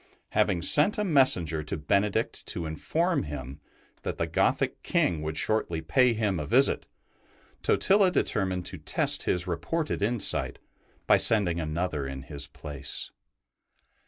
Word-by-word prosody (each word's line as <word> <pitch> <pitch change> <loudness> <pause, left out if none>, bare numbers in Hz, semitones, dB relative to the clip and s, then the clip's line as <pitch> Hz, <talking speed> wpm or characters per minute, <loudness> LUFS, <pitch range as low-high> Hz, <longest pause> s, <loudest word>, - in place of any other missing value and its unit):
Having 85 -2 0
sent 150 - +5
a 210 - 0
messenger 130 - +3
to 75 - -4
Benedict 100 +8 -1
to 85 - -2
in 80 0 -5
form 170 - -1
him 70 -2 -7 0.4
that - - -5
the - - -1
Gothic - - 0
King 85 -4 0
would 75 0 -4
shortly 110 -7 -1
pay 115 +11 +2
him 105 -5 -1
a 75 - -5
visit, - - +2 0.7
Totila 195 -1 +3
determined 95 - -1
to - - -6
test - - +1
his 90 0 0
reported 145 - -3
insight 115 +2 +1 0.5
by - - +5
sending 95 -7 +3
another 80 -2 -3
in 65 0 -7
his 70 0 -3
place. 70 -1 -3
90 Hz, 140 wpm, -27 LUFS, 75-115 Hz, 0.7 s, sent